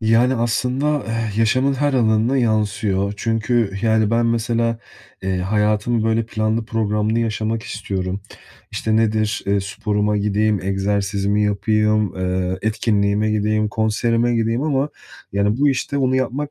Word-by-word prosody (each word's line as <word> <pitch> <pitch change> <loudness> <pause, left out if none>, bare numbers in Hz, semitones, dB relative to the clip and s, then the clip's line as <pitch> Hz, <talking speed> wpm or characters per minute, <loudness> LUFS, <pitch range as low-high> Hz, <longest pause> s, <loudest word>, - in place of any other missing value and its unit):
Yani, 115 +3 +3
aslında, 125 +5 0
eh, 115 -2 -2
yaşamın 130 +5 +2
her 145 +1 0
alanına 115 +1 +2
yansıyor 105 -3 0
çünkü, 115 -1 0
yani, 110 -2 +2
ben 115 0 +2
mesela, 115 0 0 0.4
eee, 95 -1 -1
hayatımı 105 +4 +1
böyle 115 0 +1
planlı 110 0 -1
programlı 110 0 0
yaşamak 110 0 -2
istiyorum. 95 -2 -4 0.5
İşte, 110 0 -1
nedir? 110 -1 +1
Eee, 100 0 +2
sporuma 105 +1 -1
gideyim, 105 0 +1
egzersizimi 100 +1 0
yapayım, 105 0 +1
eee, 90 0 -1
etkinliğime 105 -1 +1
gideyim, 105 0 +1
konserime 115 +3 +1
gideyim 115 +3 0
ama, 145 -2 0 0.4
yani, 100 +3 +1
bu 145 +1 +4
işte 140 +1 -1
bunu 130 0 +2
yapmak 130 +3 -2
110 Hz, 130 wpm, -20 LUFS, 105-115 Hz, 0.5 s, bu